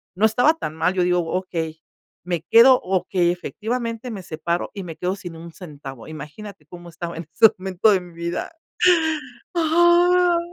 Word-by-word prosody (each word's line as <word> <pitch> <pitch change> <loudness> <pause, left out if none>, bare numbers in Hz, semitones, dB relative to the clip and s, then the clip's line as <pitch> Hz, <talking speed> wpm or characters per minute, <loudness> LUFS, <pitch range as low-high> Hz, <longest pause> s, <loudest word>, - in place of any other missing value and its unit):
No 205 +4 +3
estaba 245 +9 +3
tan 155 - -6
mal, 165 +3 +1
yo 185 - +1
digo: 180 0 +2 0.2
"Okey, 165 -4 -4 0.4
me 175 -3 -2
quedo". 250 +3 +8
Okey, 180 -1 0
efectivamente, 230 +5 -4
me 195 -4 -7
separo 170 +1 -3
y 195 - -6
me 165 -3 -8
quedo 180 +2 -2
sin 175 -4 -9
un 165 0 -11
centavo, 140 - -10
¿imagínate 155 +4 -10
cómo 175 0 -11
estaba 170 +1 -7
en 165 - -7
ese 220 +7 +6
momento 190 +3 +2
de 190 -2 +2
mi 175 -1 -13
vida? 170 +1 -4 1.0
¡Ah! 345 +2 +4
180 Hz, 165 wpm, -22 LUFS, 170-225 Hz, 1.0 s, quedo